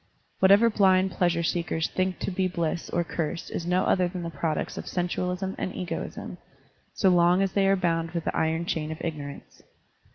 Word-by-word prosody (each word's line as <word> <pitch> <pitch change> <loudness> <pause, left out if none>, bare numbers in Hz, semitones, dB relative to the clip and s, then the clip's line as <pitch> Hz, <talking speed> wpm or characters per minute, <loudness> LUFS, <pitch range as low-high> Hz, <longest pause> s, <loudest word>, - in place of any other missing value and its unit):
Whatever 200 +5 +6
blind 190 -2 +4
pleasure 175 -2 +1
seekers 165 -1 0
think 185 0 -1
to - - -2
be 185 0 0
bliss 170 -2 -2
or 175 - 0
curse 165 0 -4
is 170 - -4
no 180 +1 +2
other 185 -1 +2
than 180 0 -5
the 170 - -4
products 155 +1 -2
of - - -7
sensualism 180 +1 -2
and 185 - -3
egoism, 180 - -5 0.6
so 190 - +3
long 175 +1 +4
as 195 - 0
they 195 -1 +2
are 195 - +4
bound 165 -3 0
with 170 0 -3
the - - -2
iron 160 +1 0
chain 155 -2 -2
of 160 - -5
ignorance. 145 -4 -6
175 Hz, 190 wpm, -26 LUFS, 165-185 Hz, 0.6 s, Whatever